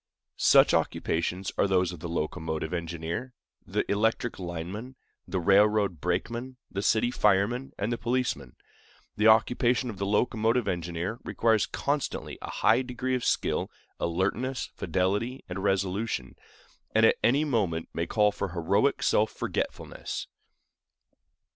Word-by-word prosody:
Such -, -, +6 dB
occupations 90 Hz, +3 st, 0 dB
are -, -, +4 dB
those 90 Hz, -2 st, +2 dB
of 90 Hz, -, -9 dB
the 85 Hz, -, -6 dB
locomotive 80 Hz, 0 st, -3 dB
engineer, 85 Hz, +8 st, -4 dB, 0.3 s
the -, -, -1 dB
electric 110 Hz, +2 st, 0 dB
lineman, 90 Hz, +8 st, -6 dB, 0.3 s
the 95 Hz, +1 st, -1 dB
railroad 100 Hz, -1 st, +3 dB
brakeman, 120 Hz, +8 st, -2 dB
the 100 Hz, -, -2 dB
city 110 Hz, +3 st, +2 dB
fireman, 105 Hz, +5 st, +2 dB
and 105 Hz, +4 st, -1 dB
the 115 Hz, -, -4 dB
policeman. 120 Hz, -, -1 dB, 0.6 s
The 105 Hz, -, +3 dB
occupation 120 Hz, +2 st, +3 dB
of 100 Hz, -, -11 dB
the 100 Hz, -, -1 dB
locomotive 115 Hz, +2 st, +1 dB
engineer 85 Hz, +5 st, -3 dB
requires 110 Hz, -2 st, +2 dB
constantly 145 Hz, 0 st, -2 dB
a -, -, -6 dB
high -, -, +3 dB
degree 125 Hz, 0 st, -3 dB
of 125 Hz, -2 st, 0 dB
skill, -, -, 0 dB, 0.3 s
alertness, 100 Hz, +10 st, -1 dB
fidelity, 100 Hz, +8 st, -1 dB
and 90 Hz, +1 st, -5 dB
resolution, 95 Hz, -, -1 dB, 0.6 s
and 110 Hz, 0 st, +6 dB
at -, -, +4 dB
any 140 Hz, +6 st, +4 dB
moment 100 Hz, -, 0 dB
may 85 Hz, 0 st, -2 dB
call 105 Hz, +1 st, +3 dB
for 100 Hz, -1 st, -3 dB
heroic 100 Hz, +10 st, +1 dB
self 110 Hz, +1 st, +3 dB
forgetfulness. -, -, -4 dB
100 Hz, 130 wpm, -28 LUFS, 90-120 Hz, 0.6 s, Such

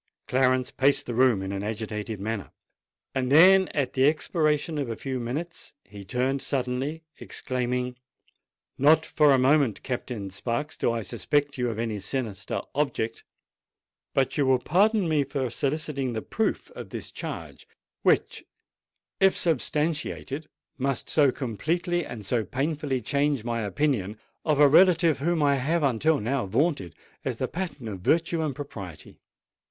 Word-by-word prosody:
Clarence 130 Hz, 0 st, +2 dB
paced 140 Hz, +1 st, +2 dB
the 120 Hz, -, -4 dB
room 120 Hz, -5 st, +3 dB
in 95 Hz, -, -4 dB
an 100 Hz, -1 st, -3 dB
agitated 105 Hz, 0 st, -4 dB
manner: 105 Hz, 0 st, -4 dB, 0.6 s
then, 165 Hz, +9 st, +6 dB
at 140 Hz, -4 st, -2 dB
the 130 Hz, 0 st, +4 dB
expiration 155 Hz, 0 st, +1 dB
of 135 Hz, -4 st, -2 dB
a 115 Hz, -, -3 dB
few 130 Hz, +2 st, -4 dB
minutes, 150 Hz, +7 st, -5 dB
he 100 Hz, -1 st, -11 dB
turned 130 Hz, +7 st, -1 dB
suddenly, 135 Hz, +4 st, -2 dB, 0.2 s
exclaiming, 125 Hz, 0 st, -2 dB, 0.8 s
"Not 155 Hz, +3 st, +5 dB
for 150 Hz, -1 st, +3 dB
a 135 Hz, -, +5 dB
moment, 135 Hz, -3 st, +3 dB
Captain 120 Hz, -6 st, -4 dB
Sparks, 120 Hz, +9 st, -3 dB
do -, -, +1 dB
I 115 Hz, -1 st, -2 dB
suspect 145 Hz, +7 st, 0 dB
you 125 Hz, -1 st, +1 dB
of 110 Hz, -, -4 dB
any 115 Hz, -2 st, -2 dB
sinister 105 Hz, -2 st, -3 dB
object: 135 Hz, -6 st, -1 dB, 0.9 s
but 135 Hz, +2 st, +1 dB
you 140 Hz, -, +3 dB
will 130 Hz, -1 st, +5 dB
pardon 195 Hz, -, +2 dB
me 155 Hz, -3 st, +2 dB
for 135 Hz, -3 st, -3 dB
soliciting 140 Hz, -2 st, -2 dB
the 110 Hz, -, -3 dB
proof 220 Hz, -, -2 dB
of -, -, -9 dB
this -, -, -7 dB
charge -, -, -7 dB, 0.3 s
which, -, -, +1 dB, 0.8 s
if 195 Hz, -1 st, +4 dB
substantiated, 155 Hz, -1 st, -1 dB, 0.3 s
must 135 Hz, -1 st, -1 dB
so 145 Hz, -4 st, +4 dB
completely 170 Hz, -, -2 dB
and 110 Hz, -4 st, -8 dB
so 115 Hz, +3 st, +1 dB
painfully 140 Hz, 0 st, -2 dB
change 140 Hz, -1 st, +1 dB
my 115 Hz, -1 st, -2 dB
opinion 110 Hz, -2 st, -1 dB, 0.3 s
of 150 Hz, -3 st, +2 dB
a 145 Hz, -, +8 dB
relative 165 Hz, 0 st, +5 dB
whom 165 Hz, +1 st, +1 dB
I 140 Hz, -1 st, +3 dB
have 155 Hz, +5 st, 0 dB
until 140 Hz, +4 st, +2 dB
now 115 Hz, -1 st, -1 dB
vaunted 110 Hz, -, 0 dB, 0.3 s
as -, -, -2 dB
the -, -, -1 dB
pattern 165 Hz, -9 st, -5 dB
of 100 Hz, -4 st, -5 dB
virtue 165 Hz, -, +1 dB
and 150 Hz, -4 st, -2 dB
propriety." 100 Hz, -, -9 dB
135 Hz, 150 wpm, -26 LUFS, 115-150 Hz, 0.9 s, a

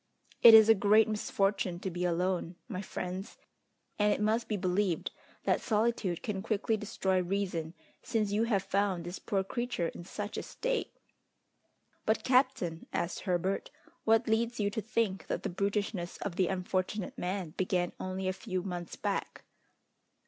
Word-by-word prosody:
It 230 Hz, -1 st, +11 dB
is 220 Hz, -1 st, +9 dB
a 225 Hz, -, +8 dB
great 215 Hz, +1 st, +5 dB
misfortune 195 Hz, -4 st, 0 dB
to 190 Hz, -, -3 dB
be 175 Hz, +1 st, -2 dB
alone, 180 Hz, 0 st, 0 dB
my 190 Hz, -6 st, -4 dB
friends; 185 Hz, 0 st, -5 dB, 0.6 s
and 210 Hz, 0 st, +4 dB
it -, -, +1 dB
must 220 Hz, +2 st, +1 dB
be 210 Hz, -, -1 dB
believed 185 Hz, -1 st, 0 dB, 0.3 s
that -, -, +2 dB
solitude 215 Hz, -5 st, 0 dB
can 200 Hz, -3 st, -2 dB
quickly 220 Hz, +1 st, 0 dB
destroy 195 Hz, -3 st, 0 dB
reason, 180 Hz, -3 st, -2 dB, 0.3 s
since 220 Hz, -4 st, 0 dB
you 215 Hz, +3 st, +2 dB
have 205 Hz, -5 st, +1 dB
found 195 Hz, -3 st, 0 dB
this 175 Hz, +2 st, -6 dB
poor 195 Hz, -2 st, 0 dB
creature 235 Hz, -5 st, -2 dB
in -, -, -9 dB
such 205 Hz, +4 st, -5 dB
a -, -, -1 dB
state!" -, -, -3 dB, 1.1 s
"But, 220 Hz, 0 st, +2 dB
captain," 255 Hz, -11 st, +2 dB
asked 170 Hz, 0 st, -2 dB
Herbert, 185 Hz, +1 st, -1 dB, 0.3 s
"what 225 Hz, +1 st, +3 dB
leads 230 Hz, +2 st, +1 dB
you 205 Hz, -1 st, +1 dB
to 220 Hz, -, -2 dB
think 215 Hz, -3 st, -1 dB
that -, -, -2 dB
the -, -, -1 dB
brutishness 200 Hz, -1 st, -2 dB
of 180 Hz, -, -4 dB
the 185 Hz, -1 st, +2 dB
unfortunate 185 Hz, +2 st, -2 dB
man 180 Hz, -2 st, -3 dB
began 180 Hz, 0 st, 0 dB
only 185 Hz, 0 st, -3 dB
a 185 Hz, -, +1 dB
few 185 Hz, -1 st, -4 dB
months 175 Hz, -3 st, -5 dB
back?" -, -, -3 dB
195 Hz, 160 wpm, -31 LUFS, 180-215 Hz, 1.1 s, It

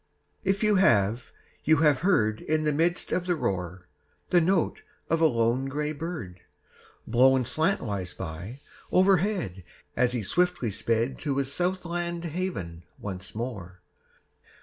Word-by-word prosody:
If 195 Hz, +2 st, 0 dB
you 210 Hz, -2 st, +4 dB
have, 115 Hz, -, +3 dB, 0.4 s
you 160 Hz, -, +5 dB
have 145 Hz, -3 st, +4 dB
heard 110 Hz, -, +2 dB
In 155 Hz, 0 st, 0 dB
the 150 Hz, -, +2 dB
midst 170 Hz, +4 st, 0 dB
of 180 Hz, 0 st, -1 dB
the 175 Hz, -, +2 dB
roar, 90 Hz, -, -3 dB, 0.4 s
The 175 Hz, -, +5 dB
note 175 Hz, 0 st, +1 dB, 0.3 s
of 165 Hz, 0 st, +2 dB
a 160 Hz, -, +7 dB
lone 120 Hz, 0 st, +1 dB
gray 150 Hz, +2 st, -2 dB
bird, 155 Hz, -, -6 dB, 0.7 s
Blown 130 Hz, +2 st, +4 dB
slantwise 120 Hz, -, -1 dB
by 95 Hz, +7 st, -6 dB, 0.3 s
overhead 185 Hz, -, +2 dB, 0.3 s
As 125 Hz, -1 st, +2 dB
he 120 Hz, -3 st, -1 dB
swiftly 175 Hz, -, +1 dB
sped 115 Hz, +5 st, -1 dB
To 140 Hz, -3 st, -2 dB
his 140 Hz, 0 st, -1 dB
south 180 Hz, +2 st, -1 dB
land 170 Hz, 0 st, -3 dB
haven 155 Hz, -, -4 dB
once 95 Hz, -1 st, -7 dB
more 95 Hz, -7 st, -6 dB
135 Hz, 140 wpm, -27 LUFS, 105-175 Hz, 0.7 s, a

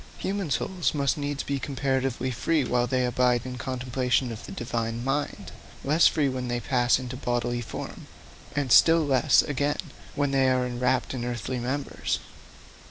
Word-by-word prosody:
Human 195 Hz, -3 st, -2 dB
souls 175 Hz, +5 st, -1 dB
must 140 Hz, -2 st, +1 dB
needs 145 Hz, -1 st, -3 dB
be 140 Hz, -1 st, -2 dB
comparatively 130 Hz, -2 st, -1 dB
free 150 Hz, +5 st, +1 dB
while 125 Hz, 0 st, +1 dB
they 130 Hz, 0 st, +1 dB
abide 125 Hz, 0 st, +2 dB
in 130 Hz, -, -5 dB
the 125 Hz, -, -6 dB
contemplation 125 Hz, 0 st, -1 dB
of 110 Hz, -, -7 dB
the -, -, -8 dB
Divine 115 Hz, 0 st, -3 dB
mind, 135 Hz, +3 st, -2 dB, 0.3 s
less 150 Hz, +5 st, +5 dB
free 150 Hz, -3 st, +2 dB
when 130 Hz, -1 st, -3 dB
they 120 Hz, 0 st, -1 dB
pass 125 Hz, -1 st, +2 dB
into 130 Hz, -1 st, -6 dB
bodily 120 Hz, -1 st, -1 dB
form, 115 Hz, -, -7 dB, 0.5 s
and 140 Hz, -4 st, -1 dB
still 165 Hz, +3 st, +6 dB
less, 140 Hz, +1 st, +4 dB
again, 145 Hz, +1 st, -1 dB, 0.4 s
when 145 Hz, -1 st, +1 dB
they 135 Hz, -1 st, +3 dB
are 130 Hz, -1 st, +2 dB
enwrapped 125 Hz, +1 st, 0 dB
in 125 Hz, -2 st, -3 dB
earthly 120 Hz, +1 st, -3 dB
members. 135 Hz, +4 st, -2 dB
130 Hz, 165 wpm, -26 LUFS, 125-140 Hz, 0.5 s, still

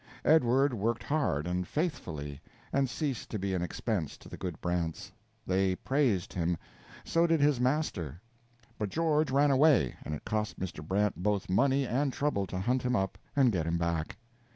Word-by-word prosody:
Edward 135 Hz, -2 st, +4 dB
worked 115 Hz, +1 st, -1 dB
hard 140 Hz, -, 0 dB
and 90 Hz, 0 st, -2 dB
faithfully, 75 Hz, -, -3 dB, 0.3 s
and 135 Hz, -2 st, +2 dB
ceased 135 Hz, -2 st, -3 dB
to 110 Hz, -, -3 dB
be 100 Hz, -1 st, -2 dB
an 90 Hz, -, 0 dB
expense 90 Hz, -, -2 dB
to -, -, -15 dB
the -, -, -8 dB
good 90 Hz, -4 st, -5 dB
Brants; 85 Hz, -2 st, -2 dB, 0.3 s
they 95 Hz, 0 st, +2 dB
praised 125 Hz, -7 st, 0 dB
him, 85 Hz, -1 st, 0 dB, 0.5 s
so 170 Hz, +1 st, +3 dB
did 165 Hz, -1 st, +3 dB
his 145 Hz, -3 st, +3 dB
master; 125 Hz, -, -1 dB, 0.6 s
but 105 Hz, -2 st, -1 dB
George 155 Hz, -, +1 dB
ran 140 Hz, +2 st, +4 dB
away, 135 Hz, -, +4 dB
and 75 Hz, -, -3 dB
it -, -, -10 dB
cost 105 Hz, +1 st, -2 dB
Mr. 90 Hz, -4 st, -5 dB
Brant 100 Hz, +5 st, 0 dB
both 100 Hz, -1 st, 0 dB
money 135 Hz, +7 st, +3 dB
and 135 Hz, +3 st, 0 dB
trouble 130 Hz, -9 st, 0 dB
to 90 Hz, -, -4 dB
hunt 125 Hz, +6 st, +1 dB
him 125 Hz, 0 st, 0 dB
up 95 Hz, -3 st, -1 dB, 0.2 s
and 135 Hz, -4 st, +5 dB
get 85 Hz, -5 st, -1 dB
him 85 Hz, +1 st, +1 dB
back. 85 Hz, -1 st, -2 dB
105 Hz, 175 wpm, -30 LUFS, 90-140 Hz, 0.6 s, and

